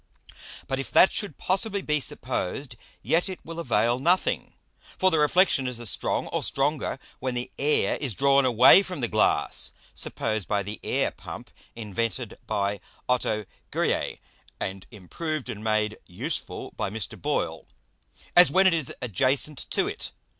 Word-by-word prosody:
But 135 Hz, -, -2 dB
if 135 Hz, -, -4 dB
that 190 Hz, -, +6 dB
should 205 Hz, -, -1 dB
possibly 195 Hz, +1 st, 0 dB
be 150 Hz, 0 st, +1 dB
supposed, 130 Hz, 0 st, -3 dB, 0.3 s
yet 175 Hz, +4 st, +2 dB
it 185 Hz, -, -6 dB
will 165 Hz, +1 st, -7 dB
avail 120 Hz, -4 st, +1 dB
nothing; 175 Hz, +7 st, +1 dB, 0.4 s
for 185 Hz, 0 st, +4 dB
the 160 Hz, -, +2 dB
Reflexion 150 Hz, -3 st, +3 dB
is 125 Hz, -2 st, -4 dB
as 120 Hz, -4 st, +1 dB
strong -, -, -1 dB
or -, -, -1 dB
stronger 140 Hz, 0 st, 0 dB, 0.2 s
when 130 Hz, -1 st, -2 dB
the 120 Hz, 0 st, -3 dB
Air 150 Hz, +2 st, +2 dB
is 130 Hz, -8 st, -3 dB
drawn 140 Hz, +2 st, +4 dB
away 125 Hz, -, +7 dB
from 180 Hz, -7 st, -5 dB
the 120 Hz, -, +1 dB
Glass, 110 Hz, -1 st, +1 dB, 0.2 s
(suppose 110 Hz, -1 st, -1 dB
by 100 Hz, +1 st, -1 dB
the 105 Hz, +2 st, -6 dB
Air -, -, 0 dB
Pump -, -, -10 dB, 0.2 s
invented 115 Hz, +1 st, -3 dB
by 100 Hz, -1 st, -1 dB, 0.3 s
Otto 110 Hz, -4 st, 0 dB, 0.2 s
Gueriet, -, -, -1 dB, 0.4 s
and 95 Hz, 0 st, -5 dB
improved 130 Hz, -, -5 dB
and 110 Hz, -3 st, -6 dB
made 110 Hz, -1 st, 0 dB
useful 90 Hz, -, -4 dB
by -, -, -2 dB
Mr. 105 Hz, -2 st, -5 dB
Boyle) -, -, -2 dB, 0.7 s
as 175 Hz, 0 st, +9 dB
when 190 Hz, +1 st, +4 dB
it 185 Hz, -, +6 dB
is 160 Hz, -5 st, 0 dB
adjacent 130 Hz, +6 st, +1 dB
to -, -, +1 dB
it. -, -, -5 dB
130 Hz, 155 wpm, -26 LUFS, 110-155 Hz, 0.7 s, as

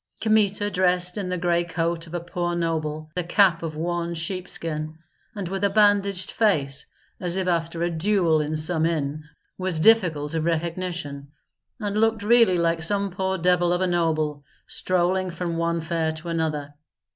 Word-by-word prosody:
Kmita 205 Hz, -2 st, +2 dB
dressed 180 Hz, -1 st, +2 dB
in 195 Hz, -3 st, -3 dB
the 180 Hz, -, -1 dB
gray 175 Hz, 0 st, +1 dB
coat 165 Hz, 0 st, -2 dB
of 165 Hz, -, -7 dB
a -, -, -1 dB
poor 175 Hz, 0 st, -3 dB
noble, 155 Hz, -2 st, -2 dB
a 180 Hz, -, -1 dB
cap 175 Hz, -1 st, +3 dB
of 160 Hz, -2 st, -5 dB
worn 170 Hz, +1 st, -2 dB
sheepskin, 165 Hz, -3 st, -3 dB, 0.4 s
and 200 Hz, -3 st, -4 dB
with 195 Hz, +2 st, -4 dB
a 200 Hz, -, +4 dB
bandaged 200 Hz, -2 st, +2 dB
face, 145 Hz, -11 st, +1 dB, 0.3 s
as 180 Hz, 0 st, 0 dB
if 190 Hz, -1 st, -1 dB
after 165 Hz, -1 st, -1 dB
a 175 Hz, -, 0 dB
duel 170 Hz, -2 st, +2 dB
in 150 Hz, +1 st, -2 dB
some 160 Hz, +1 st, +2 dB
inn, 155 Hz, -2 st, -2 dB, 0.4 s
was 185 Hz, -3 st, +2 dB
difficult 160 Hz, -7 st, +3 dB
of 160 Hz, -1 st, -1 dB
recognition, 165 Hz, -3 st, -3 dB, 0.5 s
and 210 Hz, -1 st, -1 dB
looked 225 Hz, -2 st, +1 dB
really 225 Hz, -4 st, +5 dB
like 165 Hz, -1 st, +1 dB
some 200 Hz, +4 st, +1 dB
poor 190 Hz, +1 st, -1 dB
devil 175 Hz, 0 st, +2 dB
of 180 Hz, +1 st, 0 dB
a -, -, +3 dB
noble, 155 Hz, -4 st, 0 dB, 0.2 s
strolling 185 Hz, +1 st, 0 dB
from 170 Hz, -1 st, -4 dB
one 170 Hz, 0 st, 0 dB
fair 160 Hz, -1 st, -1 dB
to 160 Hz, +2 st, -8 dB
another. 155 Hz, -3 st, -2 dB
170 Hz, 170 wpm, -24 LUFS, 160-185 Hz, 0.5 s, really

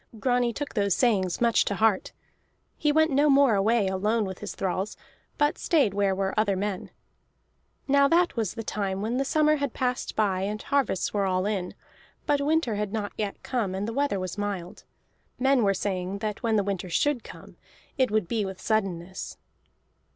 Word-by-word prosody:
Grani 245 Hz, 0 st, +2 dB
took 285 Hz, +5 st, -5 dB
those 200 Hz, -4 st, +1 dB
sayings 195 Hz, -8 st, +1 dB
much 235 Hz, -1 st, +3 dB
to 200 Hz, -, -2 dB
heart; 215 Hz, -2 st, +2 dB, 0.6 s
he 300 Hz, -, +1 dB
went 315 Hz, +1 st, +3 dB
no 290 Hz, +2 st, +3 dB
more 275 Hz, -3 st, +5 dB
away 210 Hz, +1 st, +2 dB
alone 210 Hz, +4 st, 0 dB
with 190 Hz, -1 st, -6 dB
his 210 Hz, -, -6 dB
thralls, 190 Hz, +2 st, -2 dB, 0.4 s
but 295 Hz, 0 st, +1 dB
stayed 280 Hz, -, +2 dB
where 200 Hz, -1 st, +1 dB
were 195 Hz, 0 st, -1 dB
other 205 Hz, -2 st, +2 dB
men. 195 Hz, 0 st, -3 dB, 1.0 s
Now 280 Hz, 0 st, +5 dB
that 345 Hz, +1 st, +2 dB
was 220 Hz, -5 st, -2 dB
the 225 Hz, -, -5 dB
time 200 Hz, -2 st, -2 dB
when 230 Hz, +3 st, -1 dB
the 270 Hz, -, +1 dB
summer 305 Hz, +2 st, +3 dB
had 280 Hz, -4 st, -3 dB
passed 250 Hz, 0 st, -2 dB
by 195 Hz, -4 st, +1 dB
and 210 Hz, +2 st, -2 dB
harvests 275 Hz, -9 st, 0 dB
were 200 Hz, -2 st, +1 dB
all 185 Hz, 0 st, 0 dB
in, 195 Hz, -4 st, -2 dB, 0.5 s
but 285 Hz, -1 st, +2 dB
winter 300 Hz, -5 st, +1 dB
had 210 Hz, -1 st, -2 dB
not 210 Hz, -2 st, -3 dB
yet 205 Hz, -2 st, -4 dB
come 220 Hz, -7 st, -2 dB
and 200 Hz, +2 st, -3 dB
the 230 Hz, -, -3 dB
weather 280 Hz, -6 st, 0 dB
was 185 Hz, +2 st, -5 dB
mild. 200 Hz, -2 st, -4 dB, 0.5 s
Men 265 Hz, 0 st, +3 dB
were 200 Hz, -, +4 dB
saying 190 Hz, -1 st, -2 dB
that 210 Hz, 0 st, -4 dB
when 220 Hz, -4 st, +1 dB
winter 190 Hz, -2 st, -3 dB
should 275 Hz, -, +1 dB
come, -, -, -12 dB, 0.4 s
it 260 Hz, -2 st, +2 dB
would 215 Hz, -4 st, 0 dB
be 225 Hz, +1 st, 0 dB
with 190 Hz, -1 st, -6 dB
suddenness. 190 Hz, -4 st, -2 dB
210 Hz, 185 wpm, -26 LUFS, 195-255 Hz, 1.0 s, more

